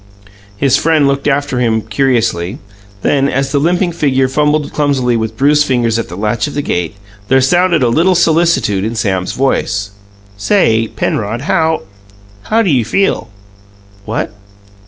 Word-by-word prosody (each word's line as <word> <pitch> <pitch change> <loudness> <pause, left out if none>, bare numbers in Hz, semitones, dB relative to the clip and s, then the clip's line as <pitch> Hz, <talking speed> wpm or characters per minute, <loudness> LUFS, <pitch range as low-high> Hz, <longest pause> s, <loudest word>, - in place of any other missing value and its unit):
His 135 +1 +2
friend 160 -3 +2
looked 140 +1 0
after 140 -2 0
him 110 -3 +1
curiously 115 -7 0 0.5
then, 140 -1 +2
as 135 +1 -1
the 140 - +1
limping 175 +4 +1
figure 135 -5 +1
fumbled 150 +2 0
clumsily 135 -5 +1
with 110 -1 -3
bruised 145 +2 +3
fingers 120 -3 +1
at - - -4
the 90 - -7
latch 105 +6 -1
of 145 - -7
the 145 - -1
gate, 90 - -2 0.3
there 135 +3 +4
sounded 170 +3 +2
a - - +3
little 170 +10 +2
solicitude 160 - +2
in 110 +2 -3
Sam's 95 -5 -1
voice. 100 -6 -1 0.5
"Say, 115 - +2
Penrod, 110 +2 -3
how 160 - 0 0.6
how 225 +1 +2
do 190 - +1
you 125 -4 +2
feel?" 120 - 0 0.8
"What?" 110 -1 -3
135 Hz, 155 wpm, -14 LUFS, 115-150 Hz, 0.8 s, there